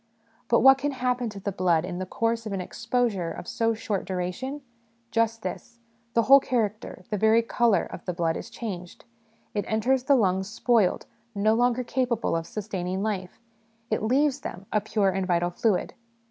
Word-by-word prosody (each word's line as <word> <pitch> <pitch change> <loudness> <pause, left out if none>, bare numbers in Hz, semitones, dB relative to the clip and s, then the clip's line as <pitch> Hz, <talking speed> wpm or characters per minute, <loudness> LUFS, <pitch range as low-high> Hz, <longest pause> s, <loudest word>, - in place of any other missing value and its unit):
But 235 - +4
what 270 +2 +7
can 285 +1 -1
happen 250 -2 -1
to 205 -2 -8
the 200 +1 -3
blood 175 -3 +2
in 180 -1 -5
the 185 - -4
course 230 +2 -1
of 205 - -4
an 195 - -2
exposure 225 -2 -1
of - - -8
so 230 -1 0
short 210 -3 -2
duration? 190 +10 -4 0.5
Just 225 0 0
this 185 +5 -6 0.4
the 230 - +4
whole 275 +4 +8
character, 215 -7 -2
the 210 - -1
very 220 +2 +4
colour, 230 -2 +2
of - - -10
the 180 - -2
blood 165 -2 0
is - - -6
changed: 180 -7 -7 0.5
it 205 - -1
enters 245 +4 +1
the 280 - +5
lungs 190 -5 +1
spoiled, 225 -3 +2 0.3
no 215 +2 +3
longer 245 +2 +2
capable 240 -5 0
of 165 0 -2
sustaining 190 -2 -3
life; 195 -3 -3 0.5
it 215 - +1
leaves 275 +5 +2
them, 195 -7 -7
a 210 - +3
pure 205 -1 +1
and 190 0 -2
vital 175 -1 +1
fluid. 200 +1 0
215 Hz, 180 wpm, -26 LUFS, 185-240 Hz, 0.5 s, whole